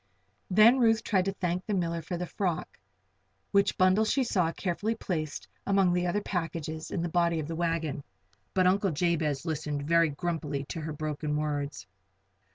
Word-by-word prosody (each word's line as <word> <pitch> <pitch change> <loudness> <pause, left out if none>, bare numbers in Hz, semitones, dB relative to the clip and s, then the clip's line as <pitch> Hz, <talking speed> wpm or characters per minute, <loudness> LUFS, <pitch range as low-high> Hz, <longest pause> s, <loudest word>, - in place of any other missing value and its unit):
Then 215 +7 +6
Ruth 225 -2 +4
tried 190 -4 +1
to 195 - 0
thank 180 -1 -2
the 210 - -2
miller 170 -2 -1
for 175 +3 -4
the 180 - -3
frock 180 -2 -3 0.7
which 200 -1 +3
bundle 185 +3 +4
she 265 +5 +2
saw 180 -8 +1
carefully 200 +6 -2
placed 155 -8 -4 0.2
among 195 -3 +3
the 180 0 +1
other 205 +4 0
packages 165 -4 -3
in 170 - -2
the - - 0
body 170 -1 +2
of 150 - -4
the 165 - -4
wagon 165 -4 -1 0.5
but 185 -1 +4
Uncle 195 +2 +3
Jabez 155 -3 0
listened 150 -3 -2
very 165 0 +4
grumpily 150 -2 -3
to 165 - -4
her 155 +1 -4
broken 150 0 -2
words. 145 -1 -3
170 Hz, 170 wpm, -29 LUFS, 155-190 Hz, 0.7 s, Then